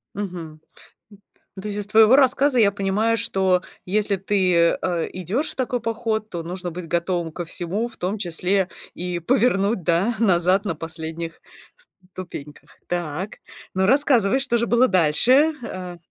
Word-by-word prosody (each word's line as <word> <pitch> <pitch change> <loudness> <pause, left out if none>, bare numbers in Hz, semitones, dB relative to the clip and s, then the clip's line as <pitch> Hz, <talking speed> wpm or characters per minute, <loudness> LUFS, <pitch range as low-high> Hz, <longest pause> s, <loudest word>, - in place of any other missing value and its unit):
Мгм. 175 -6 -6 0.5
Н 205 - -15 0.4
ну 190 - -8
то 210 - -6
есть, 205 0 -2
из 205 - -3
твоего 220 +3 +6
рассказа 275 0 +3
я 200 -2 +5
понимаю, 205 +3 0
что 190 -3 +1 0.2
если 205 +1 0
ты, 185 -3 +2
э, 175 -3 -1
идёшь 185 - -2
в - - -11
такой 250 -2 -2
поход, 225 -1 -2
то 170 -4 -5
нужно 175 0 -5
быть 175 0 -7
готовым 170 0 -1
ко 175 +1 -5
всему, 185 +8 -2
в - - -13
том 190 +4 -2
числе 185 +1 0 0.3
и 180 0 -3
повернуть, 205 -2 +1
да, 180 +8 +1
назад 190 -1 +3
на 175 - -1
последних 165 +1 -6 0.7
ступеньках. 150 -5 -10
Так. 175 +2 -4 0.4
Ну, 190 0 +2
рассказывай, 265 -4 +3
что 255 -3 +1
же 235 - 0
было 240 +2 +4
дальше. 230 - +4
Э. 180 -5 -7
190 Hz, 155 wpm, -22 LUFS, 175-225 Hz, 0.7 s, твоего